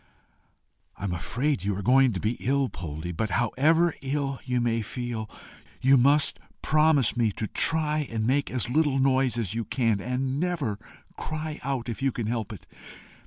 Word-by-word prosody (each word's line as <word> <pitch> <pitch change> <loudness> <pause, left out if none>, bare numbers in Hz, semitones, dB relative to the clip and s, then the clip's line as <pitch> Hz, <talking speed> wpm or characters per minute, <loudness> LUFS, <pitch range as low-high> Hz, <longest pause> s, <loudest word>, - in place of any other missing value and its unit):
"I - - -10
am 95 -3 -1
afraid 120 - -1
you 100 -1 -1
are 100 - -4
going 130 +2 +5
to 95 - -3
be 110 - 0
ill, 135 0 +1
Poldie; 80 +1 -6
but, 110 +5 -1
however 155 - +2
ill 135 -1 -2
you 125 -1 -1
may 115 -1 +1
feel, 115 -1 -5 0.5
you 135 +2 +5
must 140 +3 +3 0.2
promise 155 -5 +3
me 115 -3 +2
to 110 - -3
try 155 - +1
and 110 -1 -2
make 140 +4 +1
as 125 -2 -2
little 145 +1 +2
noise 130 -2 +2
as 110 -4 -2
you 115 0 -2
can, 115 -5 0
and 130 +3 -2
never 155 - -1 0.4
cry 155 0 -4
out 130 -3 -2
if 115 +2 -5
you 135 0 +2
can 115 -2 -4
help 110 -1 -2
it. 100 -8 -10
125 Hz, 175 wpm, -26 LUFS, 110-140 Hz, 0.5 s, going